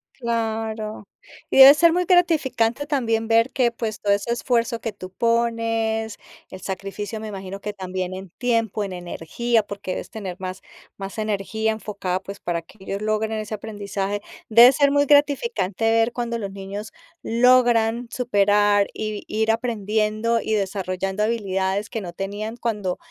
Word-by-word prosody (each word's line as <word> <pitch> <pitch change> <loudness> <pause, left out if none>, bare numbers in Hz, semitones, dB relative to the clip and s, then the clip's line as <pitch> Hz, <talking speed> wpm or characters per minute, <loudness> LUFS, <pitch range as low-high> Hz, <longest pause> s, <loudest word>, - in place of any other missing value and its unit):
Claro, 220 -3 -3 0.4
y - - 0
debe 270 +1 +12
ser 330 +2 +4
muy 360 +1 +2
gratificante 290 -8 +2
también 230 -6 0
ver 230 +2 +4
que, 245 -3 +2
pues, 225 -2 -4
todo 205 - +1
ese 205 +4 0
esfuerzo 235 -1 0
que 225 - -3
tú 185 -2 -10
pones, 230 -1 0 0.3
el 185 - -9
sacrificio 200 +3 -5
me 220 - -6
imagino 195 -1 -7
que 210 - -4
también 185 -2 -4
en 190 0 -8
tiempo, 230 -4 0
en 195 - -5
energía, 185 +6 -1
porque 200 -2 -6
debes - - -5
tener 195 -5 -6
más 185 0 -6 0.4
más 195 +2 -7
energía 215 +1 -1
enfocada, 200 -4 -3
pues, 200 +1 -9
para 170 -1 -2
que 165 +6 -20
ellos 195 +1 -4
logren 215 +1 0
ese 215 -1 -4
aprendizaje, 205 -1 -4 0.3
debe 235 +3 +9
ser 280 +1 +3
muy 285 0 +3
gratificante 285 - +2
ver 225 +1 +3
cuando 235 -1 -3
los 200 -3 -5
niños 200 +2 -7 0.3
logran 240 -1 +3
superar 205 -3 +3
y 215 -1 -4
ir 220 +1 +1
aprendiendo 220 0 0
y 220 - -2
desarrollando 195 -1 -1
habilidades 200 -2 -1
que 225 - -4
no 180 -3 -6
tenían 205 +5 -5
cuando 210 -6 -2
220 Hz, 155 wpm, -23 LUFS, 200-235 Hz, 0.4 s, debe